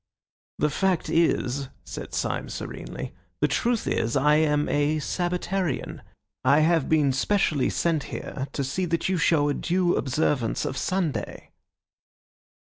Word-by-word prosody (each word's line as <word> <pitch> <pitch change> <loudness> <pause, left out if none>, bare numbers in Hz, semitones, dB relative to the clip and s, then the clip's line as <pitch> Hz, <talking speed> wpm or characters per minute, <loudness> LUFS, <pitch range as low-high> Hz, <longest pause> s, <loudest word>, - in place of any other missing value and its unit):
"The 150 - +1
fact 185 +2 0
is," 140 -5 +1
said - - -7
Syme - - -2
serenely, - - -6 0.3
"the - - +3
truth 240 -2 0
is 115 +3 0
I 150 +2 +4
am 150 -1 +2
a 145 +1 +1
Sabbatarian. 180 +1 -2 0.4
I 140 +4 +5
have 165 -2 +2
been 150 -4 +3
specially 150 -2 +1
sent 165 -4 0
here 135 -2 -5
to 140 - -1
see 160 +8 -1
that 170 +1 -1
you 190 - +1
show 155 -3 +3
a 145 - +1
due 175 +2 +1
observance 135 -2 0
of 140 -3 -3
Sunday." 180 -1 -2
155 Hz, 135 wpm, -26 LUFS, 140-175 Hz, 0.4 s, I